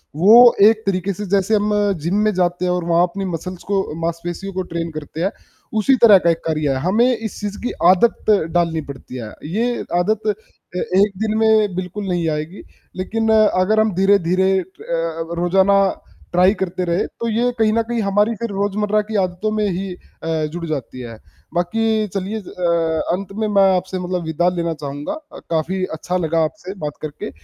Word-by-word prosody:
वो 230 Hz, +8 st, +7 dB
एक 220 Hz, 0 st, +3 dB
तरीके 195 Hz, 0 st, -1 dB
से 210 Hz, +3 st, -6 dB
जैसे 200 Hz, +2 st, +2 dB
हम 210 Hz, 0 st, +1 dB, 0.3 s
जिम 175 Hz, +4 st, 0 dB
में 215 Hz, -, +2 dB
जाते 180 Hz, -1 st, 0 dB
हैं 180 Hz, -, +1 dB
और 180 Hz, -1 st, -1 dB
वहाँ 170 Hz, 0 st, +3 dB
अपनी 195 Hz, +2 st, -2 dB
मसल्स 180 Hz, 0 st, -5 dB
को 195 Hz, -1 st, +2 dB, 0.2 s
मांसपेशियों 170 Hz, +3 st, -4 dB
को 185 Hz, -, -2 dB
ट्रेन 165 Hz, 0 st, -3 dB
करते 155 Hz, +1 st, -7 dB
हैं, 195 Hz, -, +1 dB, 0.4 s
उसी 220 Hz, +5 st, +3 dB
तरह 210 Hz, -4 st, +9 dB
का 170 Hz, -, +5 dB
एक 165 Hz, -, +2 dB
कार्य 155 Hz, -2 st, 0 dB
है 130 Hz, -, -1 dB
हमें 215 Hz, +6 st, +3 dB
इस 220 Hz, -2 st, -6 dB
चीज़ 205 Hz, -1 st, -4 dB
की 245 Hz, -, -1 dB, 0.2 s
आदत 205 Hz, +5 st, +2 dB, 0.3 s
डालनी 165 Hz, -2 st, +1 dB
पड़ती 130 Hz, -1 st, -11 dB
है, 110 Hz, -3 st, -7 dB
ये 230 Hz, +9 st, -1 dB, 0.2 s
आदत 215 Hz, +4 st, 0 dB, 0.5 s
ए -, -, 0 dB, 0.2 s
एक 205 Hz, +1 st, +4 dB
दिन 215 Hz, 0 st, 0 dB
में 220 Hz, -3 st, +3 dB
बिल्कुल 185 Hz, +2 st, -4 dB
नहीं 175 Hz, -2 st, 0 dB
आएगी 155 Hz, +5 st, -4 dB, 0.3 s
लेकिन 225 Hz, +4 st, -2 dB
अगर 215 Hz, -1 st, +3 dB
हम 215 Hz, -2 st, +2 dB
धीरे-धीरे 190 Hz, -1 st, +3 dB
अ, 185 Hz, -, -3 dB, 0.8 s
रोज़ाना 190 Hz, +3 st, +3 dB, 0.6 s
ट्राई 180 Hz, +3 st, +5 dB
करते 185 Hz, -1 st, -2 dB
रहे, 170 Hz, +2 st, 0 dB
तो 235 Hz, -, -6 dB
ये 240 Hz, +3 st, +1 dB
कहीं 215 Hz, -1 st, +2 dB
न 230 Hz, -, +2 dB
कहीं 235 Hz, -2 st, 0 dB
हमारी 205 Hz, +3 st, +2 dB
फिर 235 Hz, +2 st, -4 dB
रोज़मर्रा 205 Hz, +1 st, 0 dB
की 220 Hz, -, -4 dB
आदतों 185 Hz, +4 st, -2 dB
में 210 Hz, -, +1 dB
ही 185 Hz, +1 st, -3 dB
अ, 160 Hz, -3 st, -4 dB
जुड़ 175 Hz, -1 st, -4 dB
जाती 135 Hz, -5 st, -5 dB
है, 115 Hz, -2 st, -8 dB, 0.4 s
बाकी 215 Hz, +5 st, 0 dB
चलिए 195 Hz, +3 st, -3 dB
अ, -, -, -9 dB, 0.7 s
अंत 195 Hz, +2 st, -3 dB
में 220 Hz, -, 0 dB
मैं 195 Hz, -2 st, +4 dB
आपसे 185 Hz, +1 st, -3 dB
मतलब 180 Hz, -1 st, -3 dB
विदा 160 Hz, +3 st, +1 dB
लेना 170 Hz, -1 st, -1 dB
चाहूँगा 145 Hz, -, -5 dB
अ, 310 Hz, -1 st, -11 dB
काफ़ी 170 Hz, +3 st, -1 dB
अच्छा 180 Hz, +3 st, -2 dB
लगा 165 Hz, -2 st, +1 dB
आपसे 185 Hz, +4 st, -5 dB
बात 145 Hz, -, -5 dB
करके, 150 Hz, -1 st, -6 dB
185 Hz, 190 wpm, -19 LUFS, 170-210 Hz, 0.8 s, तरह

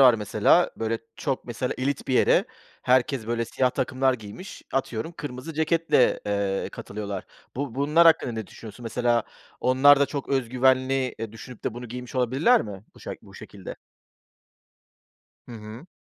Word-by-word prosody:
var 125 Hz, -3 st, +8 dB
mesela, 105 Hz, -2 st, +3 dB
böyle, 115 Hz, 0 st, -1 dB, 0.2 s
çok 135 Hz, -3 st, -2 dB
mesela 125 Hz, +1 st, -3 dB
elit 140 Hz, +1 st, -2 dB
bir 130 Hz, -, +1 dB
yere -, -, +4 dB, 0.4 s
herkes, 130 Hz, -2 st, +2 dB
böyle, 115 Hz, 0 st, -1 dB
siyah 125 Hz, +3 st, +1 dB
takımlar 130 Hz, +1 st, +1 dB
giymiş, 110 Hz, -, -10 dB
atıyorum, 135 Hz, +3 st, -2 dB
kırmızı 145 Hz, 0 st, -7 dB
ceketle, 160 Hz, -3 st, +2 dB
eee, 100 Hz, -1 st, -1 dB
katılıyorlar. 100 Hz, -2 st, -6 dB, 0.3 s
Bu 135 Hz, -4 st, -3 dB
bunlar 150 Hz, +5 st, +4 dB
hakkında 160 Hz, -6 st, +4 dB
ne 110 Hz, -2 st, -5 dB
düşünüyorsun? 110 Hz, +4 st, -11 dB
Mesela 120 Hz, 0 st, +1 dB, 0.4 s
onlar 135 Hz, +3 st, +6 dB
da 140 Hz, -, +4 dB
çok 140 Hz, 0 st, -5 dB
öz 135 Hz, -4 st, 0 dB
güvenli, 130 Hz, +1 st, +2 dB
eee, 115 Hz, -2 st, -5 dB
düşünüp 115 Hz, +1 st, -11 dB
de -, -, -2 dB
bunu 120 Hz, -1 st, -7 dB
giymiş 125 Hz, +2 st, -8 dB
olabilirler 130 Hz, -, +3 dB
mi 100 Hz, -1 st, -8 dB
bu -, -, -17 dB
şak -, -, -7 dB
bu -, -, -16 dB
şekilde? -, -, -9 dB, 1.7 s
Hı -, -, -8 dB
hı. 110 Hz, +6 st, -9 dB
125 Hz, 155 wpm, -25 LUFS, 115-135 Hz, 1.7 s, var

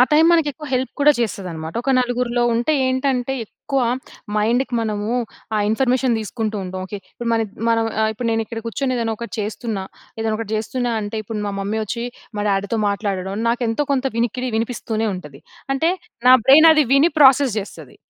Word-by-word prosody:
ఆ -, -, +9 dB
time 310 Hz, +2 st, +6 dB
మనకెక్కువ 300 Hz, -2 st, 0 dB
help 255 Hz, 0 st, 0 dB
గూడా 295 Hz, +1 st, +6 dB
చేస్తది 205 Hz, -5 st, -2 dB
అన్నమాట. 160 Hz, 0 st, -6 dB
ఒక 270 Hz, -, 0 dB
నలుగురిలో 245 Hz, -1 st, 0 dB
ఉంటే 240 Hz, +6 st, +1 dB
ఏంటంటే, 260 Hz, 0 st, 0 dB
ఎక్కువ 275 Hz, +5 st, -3 dB, 0.6 s
మైండ్‌కి 240 Hz, +4 st, +1 dB
మనము 210 Hz, -2 st, -2 dB, 0.5 s
ఆ -, -, +2 dB
ఇన్ఫర్మేషన్ 255 Hz, +1 st, +2 dB
దీసుకుంటూ 215 Hz, 0 st, -3 dB
ఉంటాం. 185 Hz, 0 st, -5 dB
ఓకె. 205 Hz, +2 st, -6 dB
ఇప్పుడు 235 Hz, -1 st, -5 dB
మానద్ 225 Hz, -3 st, 0 dB, 0.2 s
మనం 225 Hz, 0 st, +2 dB, 0.2 s
ఆహ్, 220 Hz, -, +3 dB
ఇప్పుడు 230 Hz, +2 st, -3 dB
నేను 225 Hz, 0 st, +1 dB
ఇక్కడ 230 Hz, 0 st, -5 dB
కూర్చొని 255 Hz, +2 st, -1 dB
ఏదైనా 225 Hz, -2 st, -1 dB
ఒకటి 235 Hz, +1 st, -7 dB
చేస్తున్నా. 210 Hz, -1 st, -3 dB, 0.3 s
ఏదైనా 220 Hz, -1 st, 0 dB
ఒకటి 225 Hz, -2 st, -5 dB
జెస్తున్నా 240 Hz, +2 st, -2 dB
అంటే, 205 Hz, +2 st, -4 dB
ఇప్పుడు 215 Hz, +1 st, -4 dB
మా -, -, -3 dB
మమ్మీ 210 Hz, +3 st, -2 dB
ఒచ్చి 235 Hz, +3 st, -4 dB, 0.3 s
మా 205 Hz, -, -1 dB
డ్యాడీ‌తో 200 Hz, +3 st, 0 dB
మాట్లాడడం, 195 Hz, -2 st, -2 dB
నాకెంతో 235 Hz, +3 st, 0 dB
కొంత 270 Hz, -1 st, 0 dB
వినికిడి 245 Hz, +2 st, -1 dB
వినిపిస్తూనే 225 Hz, -1 st, -2 dB
ఉంటది. 150 Hz, -6 st, -10 dB, 0.3 s
అంటే 320 Hz, +5 st, +2 dB, 0.4 s
నా 255 Hz, -, +10 dB
బ్రైన్ 310 Hz, +5 st, +8 dB
అది 310 Hz, -2 st, +4 dB
విని 290 Hz, +5 st, +5 dB
ప్రాసెస్ 265 Hz, -3 st, +6 dB
జెస్తది. 205 Hz, -, -9 dB
230 Hz, 175 wpm, -20 LUFS, 210-255 Hz, 0.6 s, నా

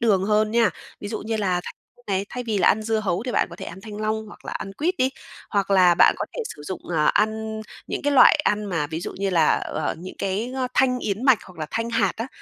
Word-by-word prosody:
đường 200 Hz, -5 st, +3 dB
hơn 215 Hz, +1 st, +2 dB
nha. 230 Hz, -3 st, +3 dB, 0.3 s
Ví 205 Hz, -, -5 dB
dụ 220 Hz, -, -3 dB
như 220 Hz, +1 st, -3 dB
là 185 Hz, -4 st, 0 dB
thanh -, -, -7 dB, 0.3 s
này, 195 Hz, 0 st, -1 dB
thay 250 Hz, -, -5 dB
vì 215 Hz, -3 st, -1 dB
là 175 Hz, -, +5 dB
ăn 215 Hz, -, +2 dB
dưa 220 Hz, 0 st, 0 dB
hấu 195 Hz, -1 st, -1 dB
thì 250 Hz, -1 st, -4 dB
bạn -, -, +2 dB
có 170 Hz, -, -9 dB
thể -, -, -7 dB
ăn 185 Hz, +3 st, -9 dB
thanh 210 Hz, 0 st, -9 dB
long 215 Hz, 0 st, -1 dB
hoặc 210 Hz, -, -14 dB
là -, -, -5 dB
ăn 195 Hz, -, -5 dB
quýt 340 Hz, -, -1 dB
đi, 260 Hz, +1 st, +2 dB, 0.4 s
hoặc 200 Hz, -2 st, 0 dB
là 180 Hz, -3 st, +6 dB
bạn -, -, +6 dB
có -, -, -1 dB
thể 480 Hz, -, -1 dB
sử 145 Hz, -, -11 dB
dụng, 185 Hz, +3 st, -5 dB
à 150 Hz, -1 st, +2 dB
ăn 220 Hz, +1 st, +1 dB, 0.3 s
những -, -, -3 dB
cái 290 Hz, -, +2 dB
loại 280 Hz, -, +7 dB
ăn 210 Hz, 0 st, +1 dB
mà 165 Hz, -7 st, -1 dB
ví 160 Hz, +2 st, -5 dB
dụ -, -, -5 dB
như 195 Hz, -1 st, 0 dB
là, 165 Hz, -4 st, +4 dB
ờ, 155 Hz, -1 st, -2 dB
những 185 Hz, +2 st, -8 dB
cái, 210 Hz, +6 st, -2 dB
a, 255 Hz, -1 st, -1 dB
thanh 255 Hz, -1 st, +3 dB
yến 210 Hz, +3 st, -3 dB
mạch 265 Hz, -5 st, +6 dB
hoặc 180 Hz, -3 st, -15 dB
là 155 Hz, -, -3 dB
thanh 230 Hz, +1 st, -2 dB
hạt 200 Hz, -5 st, +2 dB
á, 230 Hz, -, -3 dB
210 Hz, 275 wpm, -23 LUFS, 185-225 Hz, 0.4 s, loại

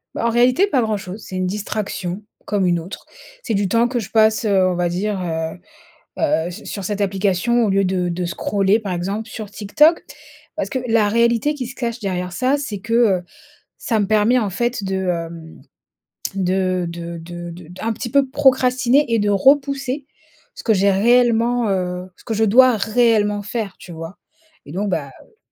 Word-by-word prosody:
Bah, -, -, -2 dB
en 235 Hz, -, +3 dB
réalité 250 Hz, -, +3 dB
pas 265 Hz, -9 st, +1 dB
grand 220 Hz, -2 st, 0 dB
chose. 195 Hz, +2 st, -8 dB
C'est 190 Hz, -, -8 dB
une 185 Hz, -, 0 dB
distraction 200 Hz, -2 st, -4 dB, 0.2 s
comme 200 Hz, -2 st, 0 dB
une 175 Hz, -1 st, +2 dB
autre. 180 Hz, +5 st, -9 dB, 0.4 s
C'est 230 Hz, -, -2 dB
du 200 Hz, -1 st, +1 dB
temps 230 Hz, +3 st, +3 dB
que 245 Hz, 0 st, -2 dB
je 210 Hz, -, -6 dB
passe, 220 Hz, 0 st, +3 dB
heu, 190 Hz, -3 st, +3 dB
on 180 Hz, -, 0 dB
va 175 Hz, 0 st, 0 dB
dire, 195 Hz, +3 st, -2 dB
heu 160 Hz, -2 st, -3 dB, 0.6 s
heu, 295 Hz, -, +1 dB
s 180 Hz, -, -9 dB
sur 200 Hz, -2 st, -6 dB
cette 205 Hz, +1 st, -3 dB
application 200 Hz, +4 st, +1 dB
au 210 Hz, -, +1 dB
lieu 195 Hz, 0 st, +2 dB
de 180 Hz, -1 st, 0 dB
de 180 Hz, +1 st, -3 dB
scroller, 200 Hz, +3 st, +1 dB
par 200 Hz, -4 st, -4 dB
exemple, 200 Hz, +6 st, -3 dB
sur 215 Hz, -3 st, -7 dB
TikTok. 295 Hz, +12 st, +3 dB, 0.5 s
Parce 310 Hz, -, -2 dB
que 260 Hz, -, -2 dB
la 225 Hz, -2 st, +3 dB
réalité 235 Hz, +6 st, +2 dB
qui 255 Hz, -4 st, -5 dB
se 250 Hz, -, -9 dB
cache 235 Hz, -1 st, -4 dB
derrière 180 Hz, -3 st, -3 dB
ça, 255 Hz, +9 st, +1 dB
c'est 245 Hz, -8 st, -4 dB
que, 230 Hz, +3 st, -6 dB
heu, 215 Hz, -7 st, +3 dB, 0.6 s
ça 225 Hz, -3 st, -1 dB
me 205 Hz, -, 0 dB
permet, 215 Hz, +4 st, +3 dB
en 215 Hz, -4 st, -1 dB
fait, 240 Hz, +3 st, -2 dB
de, 190 Hz, 0 st, -2 dB
hem, 165 Hz, -1 st, -5 dB, 0.7 s
de 185 Hz, -1 st, 0 dB
de 170 Hz, 0 st, -6 dB
de 175 Hz, +1 st, -8 dB, 0.2 s
d'un 220 Hz, +6 st, -3 dB
petit 235 Hz, -, -5 dB
peu 280 Hz, 0 st, +3 dB
procrastiner 260 Hz, 0 st, +3 dB
et -, -, +4 dB
de 205 Hz, 0 st, +1 dB
repousser 275 Hz, +5 st, +2 dB, 0.5 s
ce -, -, -10 dB
que 225 Hz, -, +3 dB
j'ai 200 Hz, +1 st, +3 dB
réellement, 235 Hz, +2 st, +3 dB
heu, 180 Hz, -1 st, -2 dB
ce -, -, -19 dB
que 225 Hz, -, -3 dB
je 220 Hz, -, +1 dB
dois 250 Hz, +3 st, +6 dB
réellement 215 Hz, -1 st, +2 dB
faire, 205 Hz, -1 st, -4 dB
tu 180 Hz, -, -11 dB
vois? 165 Hz, +3 st, -8 dB, 0.5 s
Et -, -, -11 dB
donc, 205 Hz, +2 st, -2 dB
bah, 150 Hz, -7 st, -2 dB
heu 450 Hz, -, -28 dB
210 Hz, 195 wpm, -20 LUFS, 185-235 Hz, 0.7 s, dois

